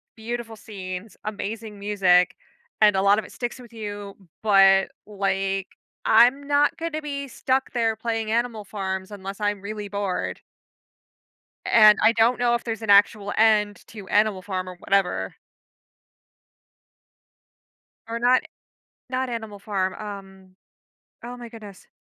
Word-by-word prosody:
beautiful 230 Hz, 0 st, -5 dB
scenes, 190 Hz, -1 st, -8 dB
amazing 215 Hz, 0 st, -5 dB
music, 195 Hz, -3 st, +3 dB, 0.5 s
and 210 Hz, -2 st, +6 dB
a 190 Hz, -, +2 dB
lot 200 Hz, +2 st, +4 dB
of 215 Hz, -, -6 dB
it -, -, -13 dB
sticks 240 Hz, +1 st, -5 dB
with 240 Hz, -2 st, -13 dB
you, 205 Hz, -2 st, -7 dB, 0.3 s
but, 195 Hz, -2 st, +5 dB
like, 195 Hz, -1 st, -1 dB, 0.4 s
I'm 250 Hz, +6 st, +5 dB
not 290 Hz, 0 st, +3 dB
gonna 325 Hz, -2 st, -4 dB
be 280 Hz, -1 st, -4 dB
stuck 265 Hz, +1 st, -1 dB
there 225 Hz, -2 st, 0 dB
playing 225 Hz, -1 st, -3 dB
Animal 230 Hz, -2 st, -1 dB
Farms 190 Hz, -1 st, -5 dB
unless 195 Hz, 0 st, -7 dB
I'm 205 Hz, -1 st, -1 dB
really 210 Hz, 0 st, -6 dB
bored 200 Hz, -2 st, -3 dB, 1.2 s
and 215 Hz, -2 st, +7 dB
I -, -, +6 dB
don't 230 Hz, +2 st, +3 dB
know 240 Hz, -1 st, +3 dB
if 235 Hz, -, -4 dB
there's 225 Hz, -1 st, -4 dB
an 220 Hz, -, -6 dB
actual 205 Hz, 0 st, +4 dB
end 210 Hz, -2 st, +3 dB
to 205 Hz, -4 st, -11 dB
Animal 205 Hz, -2 st, +2 dB
Farm 185 Hz, -2 st, -4 dB
or 180 Hz, -, -9 dB
whatever 180 Hz, -, 0 dB, 2.7 s
Or 230 Hz, +1 st, -4 dB
not 250 Hz, +1 st, +4 dB, 0.7 s
not 260 Hz, 0 st, -2 dB
Animal 220 Hz, -4 st, -6 dB
Farm, 195 Hz, -2 st, -2 dB
um 195 Hz, -2 st, -10 dB, 0.7 s
oh 245 Hz, +1 st, -7 dB
my 240 Hz, -1 st, -9 dB
goodness 215 Hz, -4 st, -12 dB
210 Hz, 135 wpm, -24 LUFS, 195-230 Hz, 2.7 s, and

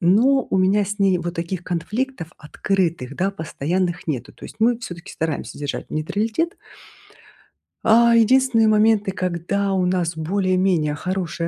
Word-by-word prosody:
Но 235 Hz, +9 st, +3 dB
у -, -, +1 dB
меня 195 Hz, +2 st, +3 dB
с 205 Hz, +2 st, -5 dB
ней 195 Hz, -3 st, +3 dB
вот 175 Hz, +1 st, -4 dB
таких 170 Hz, +1 st, -3 dB
конфликтов 180 Hz, +2 st, -3 dB
открытых, 165 Hz, -4 st, -2 dB
да, 190 Hz, +5 st, 0 dB
постоянных 175 Hz, +1 st, -3 dB
нету. 135 Hz, -6 st, -3 dB
То -, -, -14 dB
есть -, -, -10 dB
мы 235 Hz, +1 st, +2 dB
всё-таки 175 Hz, -5 st, -8 dB
стараемся 160 Hz, -2 st, -4 dB
держать 145 Hz, -1 st, -5 dB
нейтралитет. 220 Hz, -, -2 dB, 1.3 s
А 235 Hz, +1 st, +6 dB
единственные 230 Hz, 0 st, +4 dB
моменты, 215 Hz, -2 st, +3 dB
когда 185 Hz, +2 st, -2 dB
у 185 Hz, -1 st, +1 dB
нас 175 Hz, -2 st, -1 dB
более-менее 185 Hz, -2 st, +1 dB
хорошие 175 Hz, -1 st, -3 dB
185 Hz, 140 wpm, -21 LUFS, 170-215 Hz, 1.3 s, А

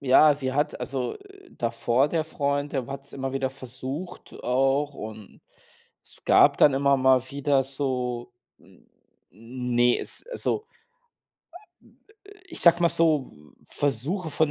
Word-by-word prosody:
ja, 140 Hz, +2 st, +6 dB
sie 130 Hz, -2 st, -3 dB
hat 145 Hz, +2 st, -1 dB
also, 125 Hz, 0 st, -3 dB
äh, 395 Hz, -1 st, -18 dB
davor 120 Hz, +3 st, +1 dB
der 160 Hz, +1 st, 0 dB
Freund, 145 Hz, -2 st, -2 dB
der 130 Hz, -4 st, -2 dB
hat's 140 Hz, 0 st, -7 dB
immer 135 Hz, -1 st, -4 dB
wieder 135 Hz, -1 st, -1 dB
versucht 135 Hz, +7 st, -8 dB
auch 135 Hz, +3 st, +1 dB
und 110 Hz, -5 st, -10 dB, 0.6 s
es -, -, -9 dB
gab -, -, +5 dB
dann 145 Hz, -, +6 dB
immer 140 Hz, 0 st, +3 dB
mal 130 Hz, -1 st, +4 dB
wieder 140 Hz, -1 st, +1 dB
so 130 Hz, -3 st, -3 dB, 0.3 s
n -, -, -23 dB, 0.4 s
ne, 120 Hz, +1 st, 0 dB
es, -, -, -7 dB
also 440 Hz, -3 st, -2 dB, 1.8 s
ich -, -, -5 dB
sage 170 Hz, 0 st, +6 dB
mal 170 Hz, -, +5 dB
so, 155 Hz, -5 st, +2 dB, 0.3 s
V -, -, -11 dB
Versuche 160 Hz, -, -2 dB
von 155 Hz, +1 st, +1 dB
135 Hz, 135 wpm, -25 LUFS, 125-150 Hz, 1.8 s, ja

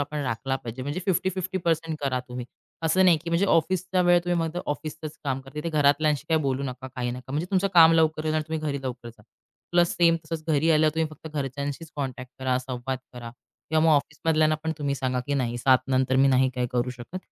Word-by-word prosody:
आपण 150 Hz, +1 st, -3 dB
राखला 130 Hz, +2 st, -2 dB
पाहिजे. 120 Hz, +1 st, -7 dB
म्हणजे, 145 Hz, +6 st, -3 dB
50-50% 185 Hz, 0 st, -1 dB
पर्सेंट 165 Hz, -1 st, -5 dB
करा 135 Hz, -3 st, 0 dB
तुम्ही. 125 Hz, 0 st, -5 dB, 0.4 s
असं 185 Hz, +4 st, +3 dB
नाही, 175 Hz, -3 st, +6 dB
की 170 Hz, -, -5 dB
म्हणजे 170 Hz, +4 st, +2 dB
ऑफिसचा 185 Hz, +2 st, +1 dB
वेळ 175 Hz, 0 st, +5 dB
तुम्ही, 175 Hz, -1 st, 0 dB
मग 165 Hz, +1 st, -3 dB
ऑफिसचच 155 Hz, +1 st, -5 dB
काम 135 Hz, -1 st, -1 dB
करता, 135 Hz, +2 st, -15 dB
तिथे 150 Hz, +2 st, -3 dB
घरातल्यांशी 145 Hz, -1 st, +2 dB
काही 160 Hz, -1 st, +3 dB
बोलू 135 Hz, 0 st, -1 dB
नका, 130 Hz, -1 st, -5 dB
काही 120 Hz, -1 st, -1 dB
नका. 130 Hz, +2 st, -8 dB
म्हणजे, 155 Hz, +5 st, -1 dB
तुमचं 195 Hz, 0 st, +2 dB
काम 165 Hz, -1 st, +8 dB
लवकर 155 Hz, -1 st, +2 dB
येणार 155 Hz, 0 st, +1 dB
आणि 155 Hz, -, -8 dB
तुम्ही 160 Hz, -1 st, -2 dB
घरी 140 Hz, -1 st, -3 dB
लवकर 125 Hz, -2 st, -5 dB
जा. 110 Hz, -2 st, -15 dB, 0.5 s
प्लस, 175 Hz, -1 st, +3 dB
सेम 170 Hz, -1 st, +4 dB
तसंच, 155 Hz, -1 st, -5 dB
घरी 160 Hz, +2 st, +3 dB
आल्यावर 155 Hz, 0 st, +3 dB
तुम्ही 160 Hz, 0 st, +1 dB
फक्त 155 Hz, +1 st, -12 dB
घरच्यांशीच 140 Hz, +3 st, -4 dB
कॉन्टॅक्ट 130 Hz, -2 st, -5 dB
करा. 130 Hz, -1 st, 0 dB
संवाद 130 Hz, 0 st, -4 dB
करा. 120 Hz, -2 st, -8 dB, 0.4 s
किंवा 160 Hz, 0 st, +3 dB
मग 165 Hz, -, +5 dB
ऑफिस 150 Hz, +1 st, -1 dB
मधल्यांना 155 Hz, -1 st, +3 dB
पण 160 Hz, -, 0 dB
तुम्ही 140 Hz, -1 st, -1 dB
सांगा, 130 Hz, -1 st, -1 dB
की 145 Hz, -, -1 dB
नाही 120 Hz, -3 st, -1 dB
7:00 130 Hz, +1 st, +5 dB
नंतर 130 Hz, 0 st, +2 dB
मी 135 Hz, +1 st, +5 dB
नाही 130 Hz, 0 st, +4 dB
काही 125 Hz, -1 st, 0 dB
करू 125 Hz, 0 st, 0 dB
शकत. 125 Hz, +8 st, -8 dB
145 Hz, 220 wpm, -26 LUFS, 130-160 Hz, 0.5 s, काम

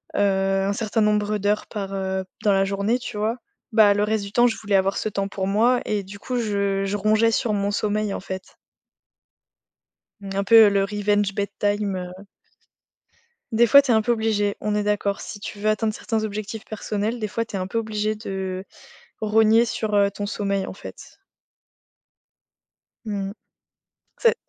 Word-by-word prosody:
heu, -, -, 0 dB
un 195 Hz, 0 st, +1 dB
certain 220 Hz, +1 st, -1 dB
nombre 210 Hz, 0 st, +1 dB
d'heures 205 Hz, +2 st, 0 dB
par 195 Hz, -2 st, -5 dB
heu, 190 Hz, 0 st, -2 dB, 0.2 s
dans 205 Hz, -, +4 dB
la 195 Hz, -, +3 dB
journée, 200 Hz, +5 st, 0 dB
tu 235 Hz, -3 st, -7 dB
vois? 220 Hz, +4 st, -1 dB, 0.3 s
Bah, 215 Hz, -2 st, +6 dB
le 205 Hz, -, +1 dB
reste 215 Hz, -1 st, 0 dB
du 200 Hz, -, -7 dB
temps, 240 Hz, +2 st, +4 dB
je 225 Hz, -, -1 dB
voulais 205 Hz, -2 st, -1 dB
avoir 195 Hz, 0 st, +2 dB
ce 215 Hz, -, -1 dB
temps 195 Hz, -1 st, -2 dB
pour 190 Hz, -1 st, -3 dB
moi 230 Hz, +5 st, +3 dB
et 205 Hz, -2 st, -1 dB
du 200 Hz, +2 st, -11 dB
coup 250 Hz, +4 st, -3 dB
je 200 Hz, -3 st, 0 dB
je 195 Hz, +1 st, -2 dB
rongeais 215 Hz, +2 st, +3 dB
sur 225 Hz, -2 st, 0 dB
mon 200 Hz, 0 st, 0 dB
sommeil, 210 Hz, 0 st, -1 dB
en -, -, -3 dB
fait. 190 Hz, 0 st, -6 dB, 1.8 s
Un 195 Hz, 0 st, -2 dB
peu 225 Hz, -1 st, +8 dB
le 200 Hz, -1 st, +2 dB
«revenge 205 Hz, 0 st, 0 dB
bedtime» 205 Hz, -1 st, -1 dB
heu 185 Hz, +2 st, -12 dB, 1.3 s
Des 235 Hz, +2 st, +5 dB
fois, 280 Hz, +5 st, +8 dB
tu 275 Hz, -, -1 dB
es -, -, +5 dB
un 220 Hz, -, +4 dB
peu 240 Hz, -, 0 dB
obligé, 215 Hz, -3 st, 0 dB
on 210 Hz, 0 st, -1 dB
est 210 Hz, -, +1 dB
d'accord. 205 Hz, -1 st, -1 dB
Si 205 Hz, -, -8 dB
tu 205 Hz, -, -7 dB
veux 215 Hz, -, +1 dB
atteindre 215 Hz, 0 st, 0 dB
certains 220 Hz, -1 st, -2 dB
objectifs 215 Hz, +1 st, -5 dB
personnels, 215 Hz, +2 st, -3 dB
des 215 Hz, -2 st, -3 dB
fois, 230 Hz, +2 st, -2 dB
tu 205 Hz, -, -8 dB
es -, -, -1 dB
un 185 Hz, -, -3 dB
peu 230 Hz, -, -3 dB
obligé 215 Hz, -1 st, -1 dB
de, 190 Hz, -2 st, -5 dB, 0.5 s
rogner 220 Hz, +2 st, +4 dB
sur, 220 Hz, -2 st, -2 dB
heu, 200 Hz, 0 st, +4 dB
ton 205 Hz, +1 st, -5 dB
sommeil 200 Hz, -2 st, -2 dB
en -, -, -7 dB
fait. -, -, -12 dB, 1.9 s
Mmh 200 Hz, -2 st, -3 dB
mh. -, -, -8 dB, 0.9 s
C'est 465 Hz, -, +4 dB
205 Hz, 185 wpm, -23 LUFS, 200-220 Hz, 1.9 s, peu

